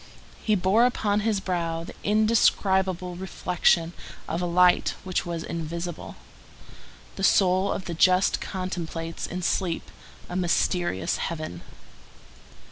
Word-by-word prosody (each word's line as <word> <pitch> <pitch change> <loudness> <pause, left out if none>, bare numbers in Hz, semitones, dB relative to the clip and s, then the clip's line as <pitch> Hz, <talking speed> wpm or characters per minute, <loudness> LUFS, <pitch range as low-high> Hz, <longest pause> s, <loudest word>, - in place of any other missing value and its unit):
He 215 - +2
bore 205 +6 +4
upon 210 -4 0
his 210 -1 0
brow 170 -3 -2
the - - -9
indescribable 190 -4 +2
reflection 175 -2 +1 0.3
of 165 +2 -2
a 175 - -1
light 180 +1 +4
which 185 -1 -2
was 170 -2 -3
invisible. 170 +1 -5 1.0
The 195 - -4
soul 190 0 +3
of 190 - -3
the 170 - -4
just 185 +3 +3
contemplates 170 -3 -4
in 180 +1 -5
sleep 170 0 -1 0.4
a 180 - -6
mysterious 175 - 0
heaven. 155 - -4
180 Hz, 120 wpm, -26 LUFS, 170-190 Hz, 1.0 s, bore